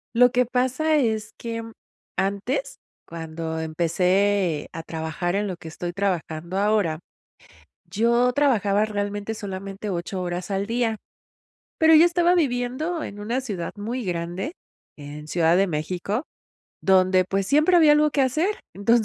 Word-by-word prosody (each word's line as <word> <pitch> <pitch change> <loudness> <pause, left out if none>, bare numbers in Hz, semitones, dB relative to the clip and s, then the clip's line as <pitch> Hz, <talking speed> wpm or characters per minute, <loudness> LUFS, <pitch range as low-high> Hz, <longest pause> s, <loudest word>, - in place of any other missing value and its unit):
Lo 245 +1 +6
que 250 0 +3
pasa 260 +6 +1
es 220 -6 0
que 230 -1 -4
mm, 225 0 -9 0.5
antes, 200 - -1 0.3
cuando 160 -1 -5
empecé 180 +2 +1
a 165 - -5
trabajar 160 +3 -3
en 205 +1 0
lo 185 - -3
que 165 - -11
estoy 175 +2 -5
trabajando 175 -2 -2
ahora, 200 -6 +1 0.9
yo 235 +5 +3
trabajaba 215 -7 +2
realmente 205 0 -3
solamente 195 0 -6
8 180 +1 -3
horas 175 +1 -4
al 195 +1 -1
día, 230 -1 0 0.8
pero 320 0 +6
yo 315 +2 +8
estaba 345 0 +3
viviendo 285 +3 -1
en 200 - -7
una 235 +5 -1
ciudad 200 -10 -5
muy 230 +4 -4
grande, 175 - -3 0.4
en 150 +1 -9
Ciudad 165 +1 +3
de 195 +1 +3
México, 180 - -2 0.6
donde, 185 -1 +4
pues, 195 +1 -1
siempre 305 - +4
había 315 -3 +7
algo 300 0 +4
que 285 - 0
hacer. 315 - 0 0.2
Entonces 225 +3 +3
205 Hz, 145 wpm, -24 LUFS, 175-245 Hz, 0.9 s, yo